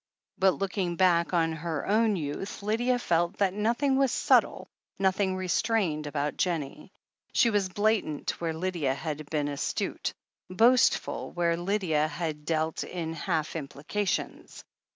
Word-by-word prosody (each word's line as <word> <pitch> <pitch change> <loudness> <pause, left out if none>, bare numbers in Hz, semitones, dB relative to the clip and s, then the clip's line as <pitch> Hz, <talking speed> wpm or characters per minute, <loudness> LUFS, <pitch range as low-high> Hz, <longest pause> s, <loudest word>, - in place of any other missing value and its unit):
But, 190 -1 +4
lool'Ing 190 -3 -2
back 175 -3 +4
upon 165 -2 +1
her 160 -1 -3
own 215 +1 +3
youth, 170 +5 -5
Lydia 240 +4 +1
felt 175 -4 0
that 195 -2 +2
notliing 240 +7 +1
was 270 -2 +3
subtle, - - +2 0.3
nothing 190 0 +1
restrained, 185 -4 0
about 145 0 -2
Jennie. 165 -6 -2 0.4
She 235 - +4
was 200 -3 +1
blatant 205 -8 0
where 165 -1 0
Lydia 160 -6 -1
had 150 0 -5
been 150 -2 0
astute, 145 -1 -2 0.4
boastful 230 +7 +3
where 170 -1 +1
Lydia 175 -4 0
had 155 -1 -4
dealt 160 0 -1
in 165 -2 -4
half 160 -2 -2
implications. 160 +7 -3
175 Hz, 130 wpm, -28 LUFS, 155-205 Hz, 0.4 s, But